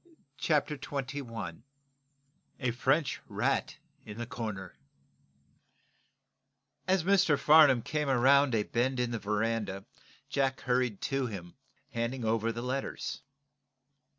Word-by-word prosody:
CHAPTER 150 -1 +1
XXI 130 - -5 1.0
A 125 -3 0
FRENCH 135 +5 +1
RAT - - -1 0.3
IN 105 - -9
THE 120 - -3
CORNER 110 -7 -6 2.1
As 185 -2 +3
Mr. 190 -5 +4
Farnum 150 -6 +6
came 150 -2 -1
around 135 +1 +4
a 105 - +2
bend 125 +4 0
in 125 -1 0
the 115 - -2
veranda 105 -1 -1 0.4
Jack 135 -1 0
hurried 125 -4 0
to 135 -2 -1
him, 90 -6 -7 0.4
handing 120 0 -2
over 115 +1 +1
the 115 +1 -5
letters. 130 +2 -3
125 Hz, 110 wpm, -30 LUFS, 115-140 Hz, 2.1 s, Farnum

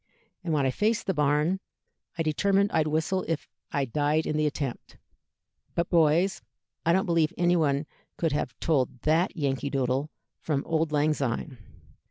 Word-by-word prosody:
And 170 - -2
when 145 -3 +2
I 130 - +2
faced 210 - 0
the 190 - 0
barn 150 +4 +2 0.6
I 165 - +1
determined 195 +6 +2
I'd 155 -1 +2
whistle 160 +5 0
if 165 -2 -2 0.2
I 140 -1 0
died 150 +5 +1
in 150 - -1
the 155 0 +2
attempt; 140 -4 -5 0.8
but, 170 0 -1
boys, 170 0 +3 0.4
I 170 - +3
don't 190 +2 +3
believe 165 -3 +2
anybody 160 -5 +2 0.3
could 165 -2 0
have 145 -3 -3
told 130 -6 0
that 165 +4 +1
'Yankee 140 -1 -1
Doodle' 135 +1 0 0.3
from 145 -3 -1
'Auld 160 -1 0
Lang 150 +1 +2
Syne.' 130 -1 -3
155 Hz, 160 wpm, -27 LUFS, 145-170 Hz, 0.8 s, boys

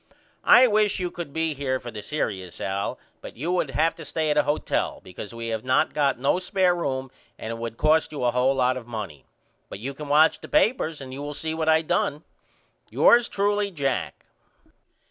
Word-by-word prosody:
I 255 - +8
wish 210 -4 +2
you 180 -1 -2
could 170 -5 -7
be 160 +1 -1
here 130 -2 -2
for 120 -1 -8
the 105 -1 -7
serious 95 - -4
Al 100 +1 -2 0.2
but - - -10
you 160 +8 -2
would 180 -5 0
have 160 +4 +1
to 165 - -8
stay 155 +1 -1
at 150 - 0
a - - +6
hotel 145 +1 -1
because 95 +3 -9
we 115 0 -5
have 110 -1 -3
not 130 +4 +2
got 140 -2 +1
no 135 +7 +1
spair 185 -1 +1
room 130 -6 -3 0.3
and 110 - -6
it 115 - -5
would 115 -1 -5
cost 155 +1 +2
you 145 -4 -5
a 120 - +3
hole 125 +2 +2
lot 130 0 +2
of 120 -2 -9
money. 105 - -7 0.4
But - - -7
you 130 +7 -5
can 150 +2 -8
watch 155 +2 +4
the - - -9
papers 220 - +1
and 130 -1 -8
you 135 - -6
will 145 0 -5
see 160 +2 -2
what 160 0 -1
I 160 0 +4
done. 150 0 -1 0.7
Yours 240 0 +5
truly, 205 0 0
JACK. 140 -8 -3
145 Hz, 210 wpm, -25 LUFS, 125-165 Hz, 0.7 s, I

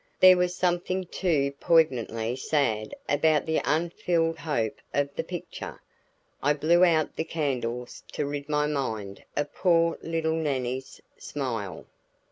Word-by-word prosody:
There 185 0 +9
was 180 0 +1
something 180 +1 0
too 155 -6 0
poignantly 125 -8 +2
sad 130 -6 0
about 150 +1 +3
the 160 0 +1
unfulfilled 165 0 0
hope 115 -9 -1 0.2
of 140 0 0
the - - -1
picture. - - -7 0.6
I 145 +2 +3
blew 165 +4 +4
out 160 -3 +3
the - - -1
candles 125 -7 -3
to 150 - -1
rid 145 +1 -4
my 150 0 +2
mind 110 -9 -3
of 145 0 -2
poor 170 -2 +3
little 165 -1 -1
Nannie's 130 -5 -2 0.2
smile. 115 -9 -4
150 Hz, 130 wpm, -27 LUFS, 130-165 Hz, 0.6 s, There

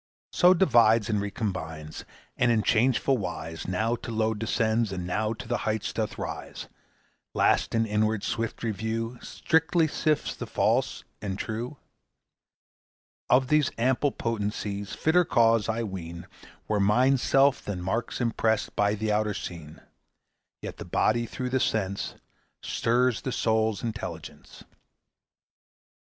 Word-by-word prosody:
So 180 +1 +5
divides 115 - +4
and 105 -1 +1
recombines, 90 -7 -5 0.3
And 120 -1 +3
in 110 -2 +2
changeful 125 +2 +2
wise 80 -3 -5
Now 110 +6 0
to 115 - -7
low 110 0 +1
descends, 110 0 0
and 90 -2 -4
now 105 +5 -1
To 115 +1 -9
the 120 0 0
height 110 -1 -2
doth - - -3
rise; - - -6 0.7
Last - - +2
in 115 0 +2
inward 110 -1 0
swift 115 0 -3
review 115 +2 -3
Strictly 160 0 +1
sifts 155 0 0
the - - -6
false - - 0 0.2
and 95 -2 -3
true? 115 +7 -4 1.5
Of 130 +1 +4
these 150 -3 +3
ample 130 +4 +2
potencies 105 -3 -3
Fitter 175 +3 +3
cause, 115 - +3
I 115 +1 -1
ween, 85 -4 -6 0.4
Were 105 -1 +1
Mind's 125 +6 +3
self 135 0 +3
than 100 -3 -4
marks 95 +7 -2
impressed 115 -2 0
By 105 0 +2
the 110 +1 -1
outer 105 -1 +1
scene. 80 -5 -8 0.8
Yet - - -6
the - - -6
body 120 +2 +1
through 125 +2 -4
the 130 - +2
sense 100 -5 -1 0.5
Stirs 120 0 +1
the 130 - -3
soul's 110 -3 +1
intelligence. 110 -2 -7
110 Hz, 135 wpm, -27 LUFS, 105-120 Hz, 1.5 s, So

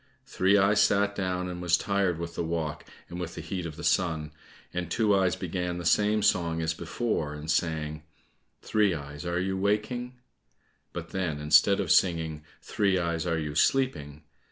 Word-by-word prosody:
Three 95 +2 +2
eyes 100 +1 +4
sat 100 0 +3
down 90 -2 -2
and 90 -1 -6
was 85 -1 +3
tired 100 -4 0
with 85 0 -5
the 85 - -2
walk 80 -2 -3 0.2
and 90 - -7
with 85 -1 -5
the - - -6
heat 90 -3 -4
of 80 - -8
the 85 - -9
sun, 80 -5 0 0.4
and 90 -2 -3
Two 110 +1 +2
eyes 95 -2 +2
began 90 -1 -3
the 85 - -6
same 105 +4 +3
song 85 -2 +2
as 80 0 0
before, 80 -3 -2
and 75 +2 -4
sang, 80 -1 -1 0.6
"Three 105 -4 +2
eyes, 75 +2 -7
are 85 0 0
you 95 +1 -1
waking?" 110 +5 -1 0.8
but - - -7
then, 85 -6 -2
instead 80 +7 +4
of 95 -5 0
singing, 80 -4 +2 0.2
"Three 100 -3 +1
eyes, 85 0 -1
are 85 -1 +1
you 75 -2 -3
sleeping?" 75 - 0
90 Hz, 180 wpm, -28 LUFS, 80-100 Hz, 0.8 s, eyes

